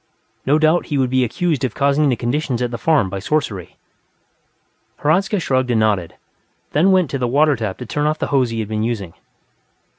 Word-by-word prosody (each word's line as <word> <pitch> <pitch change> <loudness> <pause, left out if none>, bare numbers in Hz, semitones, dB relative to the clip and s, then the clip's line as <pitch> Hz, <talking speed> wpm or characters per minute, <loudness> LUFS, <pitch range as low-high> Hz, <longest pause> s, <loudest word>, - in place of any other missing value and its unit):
No 145 +3 +4
doubt 155 +2 +2
he 145 - -1
would 130 -2 +1
be 130 0 +3
accused 145 +5 -1
of 130 - -2
causing 140 +1 +2
the 125 - +2
conditions 125 +2 -2
at 125 -1 -2
the 120 - -5
farm 150 -6 +2
by 95 +1 -5
sorcery. 105 - -2 1.3
Hradzka 190 +7 +2
shrugged 130 -5 0
and 120 -2 +2
nodded, 105 -6 0 0.6
then 170 +7 +3
went 185 -5 +2
to 135 - -2
the 125 - 0
water 145 +4 +3
tap 110 -5 -4
to 125 - -7
turn 150 +6 -1
off 155 +1 0
the - - -3
hose 130 -3 +3
he 115 -1 -3
had 110 - -5
been 110 0 -2
using. 110 -7 -3
130 Hz, 205 wpm, -19 LUFS, 115-150 Hz, 1.3 s, No